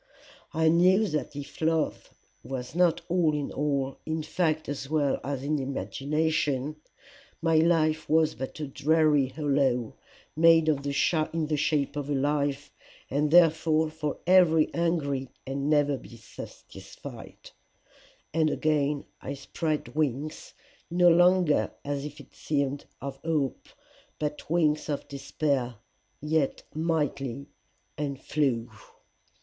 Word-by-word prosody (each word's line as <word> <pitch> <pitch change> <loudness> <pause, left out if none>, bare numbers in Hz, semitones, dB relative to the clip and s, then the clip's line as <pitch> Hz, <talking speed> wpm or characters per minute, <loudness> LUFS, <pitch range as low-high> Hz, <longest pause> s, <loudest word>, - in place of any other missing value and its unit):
I 160 0 +2
knew 180 +6 +5
that 150 -1 -3
if 145 +2 -8
love 160 -1 0 0.3
was 130 -1 -6
not 175 -1 +3
all 170 -4 +2
in 145 -1 -3
all, 140 -2 -1
in 160 0 -3
fact 155 -2 0
as 140 -1 -5
well 145 -3 +1
as 135 -1 -3
in 150 +1 0
imagination, 145 +1 -1 0.6
my 165 -1 +2
life 160 -1 +2
was 160 0 +3
but 130 +6 -6
a 150 - -2
dreary 150 0 +3
hollow 135 -4 0 0.4
made 165 0 +5
in 155 -2 +3
the 140 0 -3 0.7
shape 145 -1 0
of 145 -1 -4
a 145 - +1
life, 145 0 0 0.4
and 145 +3 +1
therefore 160 -1 +4
for 155 -2 -3
ever 170 -4 +5
hungry 145 -6 0 0.2
and 140 +2 -2
never 145 -2 +3
to - - -12
be 115 - -13
satisfied. 110 - -11 0.8
And 160 -1 +3
again 150 -2 0 0.2
I 140 - -5
spread 155 +2 -3
wings 150 0 -2 0.3
no 175 +1 +5
longer 175 -2 +4
as 145 0 -2
it 150 0 -10
seemed 140 -1 -2 0.2
of 140 0 -5
hope, 150 -3 -2 0.5
but 150 -1 -4
wings 155 -2 +1
of 145 - -3
despair, 135 -2 -2 0.4
yet 150 -1 0
mighty, 145 -5 -1 0.5
and 140 -3 -3
flew. 130 -6 0
150 Hz, 125 wpm, -27 LUFS, 140-160 Hz, 0.8 s, knew